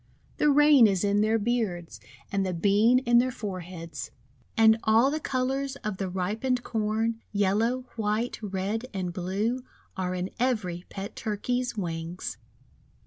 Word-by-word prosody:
The 300 - +3
Rain 290 -4 +7
is 195 -2 0
in 205 0 +2
their 220 +1 +3
beards, 210 -7 -2 0.3
and 195 -1 +1
the 185 -2 -2
Bean 205 +7 +4
in 240 -2 +4
their 255 +1 +2
foreheads. 180 - -6 0.5
And 220 0 +6
all 225 +5 +4
the 310 - -1
colours 270 0 -1
of 210 -3 -3
the 190 -1 -2
ripened 220 +8 -1
Corn 225 +1 -1
— - - -40
yellow, 210 +5 +1 0.2
white, 220 +2 -1
red, 205 +4 -3
and 180 -2 -2
blue 205 +8 -1 0.2
— - - -34
are 185 -1 -2
in 180 +1 -3
every 195 -9 -1
pet 195 +1 -7
Turkey's 240 +3 -2
wings. 170 -1 -4
215 Hz, 150 wpm, -27 LUFS, 185-240 Hz, 0.5 s, Rain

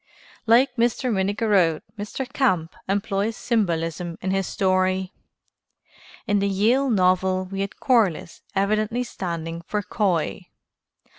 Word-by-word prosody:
Like 250 +3 +4
Mr. 240 +1 +1
Minnigerode, 195 -4 +2
Mr. 215 +5 -5
Camp 185 - 0 0.2
employs 200 +2 -1
symbolism 170 -6 -1
in 190 - -2
his 195 -1 0
story. 185 0 0 1.1
In 205 0 +2
the 200 0 +1
Yale 230 +8 +2
novel 185 -2 +2
we 195 +1 -4
had 200 0 -5
Corliss 215 - +1
evidently 215 +4 +1
standing 170 -6 -5
for 210 -1 -1
Coy. 185 -6 -1
195 Hz, 115 wpm, -23 LUFS, 185-220 Hz, 1.1 s, Like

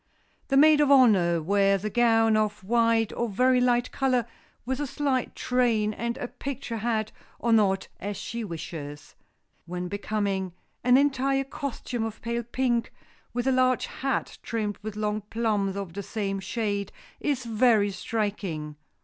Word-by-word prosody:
The 270 - +2
maid 300 +1 +7
of 290 - +3
honor 195 - +5
wears 195 +2 +2
a - - 0
gown 225 -1 +4
of 210 -2 0
white 230 +1 +2
or 235 -1 -2
very 250 +5 +3
light 245 0 +2
color, 255 -3 +1 0.4
with 260 +2 -2
a 290 - -2
slight 270 -2 -1
train, 230 -4 +1
and 235 +2 -3
a 245 - -4
picture 255 -3 -5
hat, 220 -1 -1 0.3
or 235 -1 +1
not, 195 -3 +3
as 205 +1 -4
she 235 0 -5
wishes. 160 -5 -7 0.5
When 180 +1 -4
becoming, 200 -2 -2 0.3
an 250 +1 +6
entire 275 -1 +2
costume 260 -3 -4
of 225 -1 -5
pale 235 0 -1
pink, 240 0 -1 0.4
with 245 0 -2
a 265 - +3
large 255 -1 +2
hat 270 0 -3
trimmed 215 -3 -3
with 215 0 -6
long 210 0 -1
plumes 210 -4 0
of 195 -4 -5
the 200 - -4
same 200 -1 -3
shade, 200 -1 -2 0.3
is 280 -4 -1
very 225 -3 +3
striking. 195 -9 -3
225 Hz, 155 wpm, -27 LUFS, 200-250 Hz, 0.5 s, maid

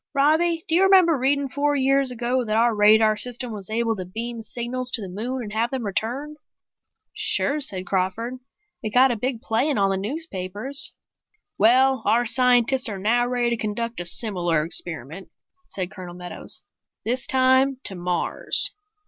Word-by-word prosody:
"Robbie, 320 +4 +2
do - - -2
you 350 - +4
remember 375 -4 +5
reading 280 +1 0
four 290 +2 -1
years 275 0 +2
ago 250 +1 -1
that 215 -2 -2
our 235 +1 +3
radar 215 +1 +4
system 245 +2 -4
was 205 -2 -7
able 225 0 0
to 185 - -4
beam 230 +5 -6
signals 245 +3 -1
to 230 - +5
the - - -6
moon 240 +7 -4
and 210 -1 -8
have 230 +2 0
them 260 -3 -4
returned?" 255 +9 -3 0.8
"Sure," 290 +2 0
said 190 -10 -2
Crawford. 200 +7 -2 0.4
"It 215 -2 -5
got 260 +1 +6
a - - -1
big 240 +1 -3
play 230 +7 0
in 285 - 0
all 195 -1 +2
the 195 - 0
newspapers." 215 - -1 0.7
"Well, 260 +5 +4
our 240 +2 +2
scientists 250 +1 +3
are 200 - -5
now 235 +5 +1
ready 245 -1 0
to 235 - 0
conduct 230 +1 -4
a 175 - -2
similar 175 -6 0
experiment," 165 +1 -3 0.4
said 185 -2 -4
Colonel 180 -2 -9
Meadows. 180 0 -1 0.4
"This 250 +3 -1
time 260 +1 +3
to - - -4
Mars." 180 -1 0
235 Hz, 170 wpm, -23 LUFS, 205-260 Hz, 0.8 s, got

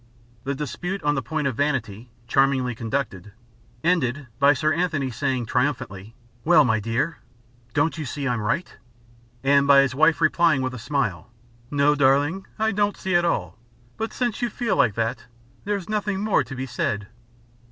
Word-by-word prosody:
The 140 +1 -1
dispute 175 +7 -4
on 145 0 +2
the 135 - -1
point 150 +4 -3
of 135 -4 0
vanity, 125 -5 -2 0.2
charmingly 135 -2 +2
conducted, 110 -5 -4 0.5
ended 145 -5 +1
by 140 +1 +6
Sir 155 +4 +1
Anthony 155 -7 -1
saying 130 0 -1
triumphantly: 115 -5 -2 0.3
"Well, 155 -3 +6
my 110 -3 +2
dear, 115 +9 -2 0.6
don't 145 +3 +2
you 155 - -3
see 140 +1 -4
I'm 120 -3 -1
right?" 170 +12 -2 0.7
and 140 +1 +4
by 140 -1 +8
his 135 -2 0
wife 155 +4 +3
replying 155 -4 +3
with 130 0 -2
a 125 - -7
smile: 120 - -2 0.4
"No, 145 0 +3
darling, 145 +6 +2
I 220 0 +1
don't 205 0 0
see 190 - -3
at 175 0 +4
all. 95 - -2 0.4
But 225 - -3
since 240 -3 -2
you 240 - 0
feel 230 0 -1
like 115 -7 +3
that, 115 +1 -2 0.4
there's 200 -3 -2
nothing 210 -2 -1
more 210 0 +2
to 135 - -8
be 130 +1 -4
said." 105 -4 -2
140 Hz, 170 wpm, -24 LUFS, 125-165 Hz, 0.7 s, by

